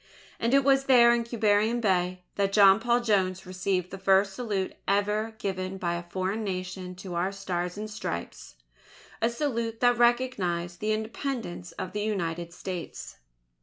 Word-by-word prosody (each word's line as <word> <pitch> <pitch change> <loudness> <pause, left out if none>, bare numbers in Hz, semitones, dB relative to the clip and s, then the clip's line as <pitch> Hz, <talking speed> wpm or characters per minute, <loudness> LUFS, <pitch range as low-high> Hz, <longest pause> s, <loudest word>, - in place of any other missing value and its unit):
And 235 +4 +2
it 275 - +5
was 270 0 +3
there 240 -3 +7
in 235 0 +1
Quiberon 220 0 +2
Bay, 185 -4 0
that 200 -1 0
John 195 -1 +7
Paul 240 +1 +2
Jones 190 -5 +1
received 185 0 -2
the 195 - -7
first 195 0 +3
salute 200 -4 -2
ever 210 +2 0
given 190 -3 -3
by 175 -2 -1
a 175 - -3
foreign 190 +4 -2
Nation 185 -1 -4
to 180 0 -8
our 175 +3 0
Stars 180 -2 -3
and 215 +1 -4
Stripes 150 - -6 0.7
a 230 - +3
salute 235 -3 -2
that 245 -1 +4
recognized 190 -9 +1
the 215 +1 -1
Independence 220 -5 -4
of 185 - -5
the 210 - -3
United 175 -5 -2
States. 180 0 -7
200 Hz, 160 wpm, -27 LUFS, 185-230 Hz, 0.7 s, there